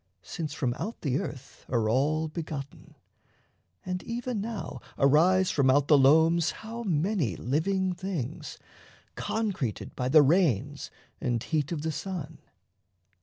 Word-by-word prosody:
since 160 Hz, -4 st, -5 dB
from 125 Hz, -6 st, 0 dB
out 225 Hz, -, -4 dB
the 140 Hz, -2 st, 0 dB
earth 135 Hz, -1 st, -8 dB
Are 115 Hz, -3 st, +1 dB
all 150 Hz, +7 st, +1 dB
begotten. 150 Hz, -3 st, -7 dB, 0.9 s
And 180 Hz, 0 st, -3 dB
even 235 Hz, -2 st, -3 dB
now 225 Hz, 0 st, -5 dB, 0.2 s
arise 175 Hz, +7 st, +4 dB
From 140 Hz, -3 st, +3 dB
out 140 Hz, +2 st, +3 dB
the 150 Hz, -, +8 dB
loams 160 Hz, +4 st, +5 dB, 0.2 s
how 230 Hz, +2 st, -5 dB
many 170 Hz, -, 0 dB
living 185 Hz, -, 0 dB
things 175 Hz, -7 st, -5 dB, 0.6 s
Concreted 195 Hz, -, -3 dB
by 125 Hz, 0 st, -1 dB
the 155 Hz, +1 st, +7 dB
rains 145 Hz, -, +1 dB, 0.3 s
and 120 Hz, -3 st, -1 dB
heat 155 Hz, 0 st, -1 dB
of 155 Hz, -3 st, -3 dB
the 160 Hz, -, -1 dB
sun. 160 Hz, -1 st, -5 dB
155 Hz, 130 wpm, -28 LUFS, 140-185 Hz, 0.9 s, the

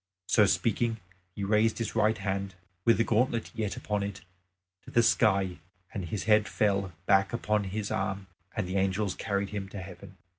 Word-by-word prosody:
So 105 Hz, +2 st, +4 dB
speaking 115 Hz, +3 st, +1 dB, 0.4 s
he 100 Hz, -, -4 dB
raised 105 Hz, +2 st, +2 dB
his 115 Hz, -2 st, -3 dB
right 110 Hz, 0 st, +2 dB
hand, 100 Hz, -1 st, -3 dB, 0.3 s
with 115 Hz, -, +5 dB
the 115 Hz, -, +3 dB
gauntlet 115 Hz, +1 st, +1 dB
yet 110 Hz, -5 st, -3 dB
upon 105 Hz, -1 st, -2 dB
it, 100 Hz, -2 st, -4 dB, 0.6 s
to -, -, -13 dB
the 115 Hz, -, +3 dB
sky, 95 Hz, -6 st, +3 dB, 0.3 s
and 95 Hz, -, -3 dB
his 95 Hz, +3 st, -3 dB
head 110 Hz, -1 st, +4 dB
fell 100 Hz, -3 st, +1 dB
back 95 Hz, 0 st, +3 dB
upon 105 Hz, -3 st, 0 dB
his 100 Hz, +2 st, -3 dB
arm 95 Hz, 0 st, -2 dB, 0.3 s
and 105 Hz, -4 st, -1 dB
the 95 Hz, +2 st, -1 dB
angels 95 Hz, 0 st, +1 dB
carried 100 Hz, -2 st, -2 dB
him 100 Hz, -2 st, -4 dB
to 100 Hz, -, -7 dB
heaven. 95 Hz, +1 st, -10 dB
100 Hz, 180 wpm, -29 LUFS, 95-110 Hz, 0.6 s, with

